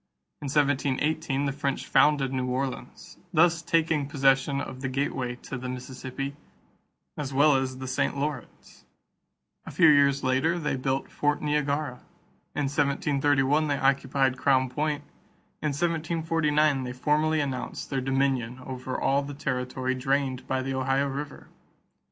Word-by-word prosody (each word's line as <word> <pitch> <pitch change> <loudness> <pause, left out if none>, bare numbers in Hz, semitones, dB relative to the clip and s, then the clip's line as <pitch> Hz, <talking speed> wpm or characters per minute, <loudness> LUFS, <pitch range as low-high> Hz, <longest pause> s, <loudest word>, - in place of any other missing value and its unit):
In 145 - -4
1718, 145 +1 +1
the 140 - 0
French 140 -1 -2
founded 140 -3 +3
New 130 -1 -1
Orleans, 130 +1 -4
thus 165 +1 +4
taking 160 -3 +1
possession 135 0 +2
of 130 -1 -6
the 135 - -2
gateway 130 -2 -2
to 135 - -5
the 125 0 -5
Mississippi 130 +2 -6 0.8
as 140 -2 -5
well 145 +1 +5
as 130 -1 -1
the 130 - -6
St. 130 - -1
Lawrence. 140 -3 -6 0.8
A - - -4
few 165 - +5
years 140 -2 +5
later 135 +7 +2
they 150 -4 -1
built 130 +1 -2
Fort 145 0 0
Niagara; 145 -3 -1 0.6
in 145 - 0
1731 145 +1 +1
they 145 -1 0
occupied 135 -1 +1
Crown 130 -2 +2
Point; 150 +1 -1 0.6
in 155 - 0
1749 155 -2 +1
they 125 -1 -5
formally 155 +4 +1
announced 135 -1 -4
their 135 -1 0
dominion 135 -2 0
over 130 0 -5
all 140 +1 +2
the 145 0 -7
territory 130 -1 -2
drained 130 0 -1
by 130 0 -1
the 135 0 -3
Ohio 135 +1 +1
River. 140 +1 -6
140 Hz, 140 wpm, -27 LUFS, 130-150 Hz, 0.8 s, well